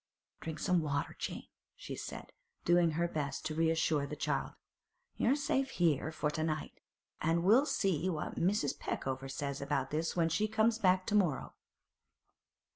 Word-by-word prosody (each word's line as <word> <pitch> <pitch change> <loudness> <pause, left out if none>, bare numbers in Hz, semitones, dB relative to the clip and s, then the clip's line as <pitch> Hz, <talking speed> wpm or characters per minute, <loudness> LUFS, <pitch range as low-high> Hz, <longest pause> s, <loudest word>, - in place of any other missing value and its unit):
'Drink 160 -1 -5
some 180 -3 +2
water, 145 -2 -2
Jane,' - - -4 0.3
she - - -7
said, - - -7 0.3
doing 175 -2 +4
her 170 +2 +1
best 145 -3 -3
to 155 - -1
reassure 160 -2 +2
the 150 - -5
child. - - -1 0.6
'You're 250 +4 +3
safe 270 -2 0 0.4
for 150 -1 0
to 155 +1 -2
night, 155 -1 -3 0.4
and 165 +2 +2
we'll 235 +10 +5
see 185 - +1
what 155 -4 -3
Mrs. 175 -6 +1
Peckover 135 0 -3
says 140 0 -3
about 140 -1 -1
this 160 +2 -1
when 165 -2 +2
she 210 +6 +1
comes 220 +1 +2
back 185 -2 +3
to - - -2
morrow. 180 -10 +1
165 Hz, 155 wpm, -33 LUFS, 150-185 Hz, 0.6 s, we'll